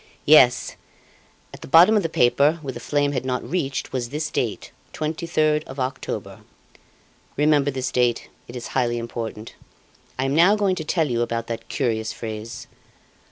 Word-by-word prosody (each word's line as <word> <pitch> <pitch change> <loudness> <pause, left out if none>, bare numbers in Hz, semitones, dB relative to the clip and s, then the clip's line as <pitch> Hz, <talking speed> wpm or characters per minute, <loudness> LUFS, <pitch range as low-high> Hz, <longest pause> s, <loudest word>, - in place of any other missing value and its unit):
"Yes; 130 -5 +5 0.8
at - - -11
the - - -9
bottom 170 +9 +7
of 210 - +3
the 165 - -2
paper, 140 +4 +3
where 135 - -4
the - - -7
flame 145 -1 0
had 130 -3 -2
not 125 -1 -3
reached, 140 -6 -3
was 120 -2 -2
this 150 +2 -3
date: 115 -4 -3 0.2
23rd 155 -1 0
of 135 +1 -9
October. 130 0 -4 1.0
Remember 145 -1 +3
this 130 -2 -3
date, 120 -2 +1 0.2
it 120 - -10
is 120 -2 -6
highly 120 -2 0
important. 115 -2 -6 0.6
I 130 - -1
am 135 - 0
now 175 +7 +5
going 200 -3 +1
to 160 - -3
tell 160 0 0
you 120 -3 -1
about 115 -1 -2
that 115 -1 -6
curious 110 -5 -1
phrase. 115 +2 -7
130 Hz, 165 wpm, -23 LUFS, 120-155 Hz, 1.0 s, bottom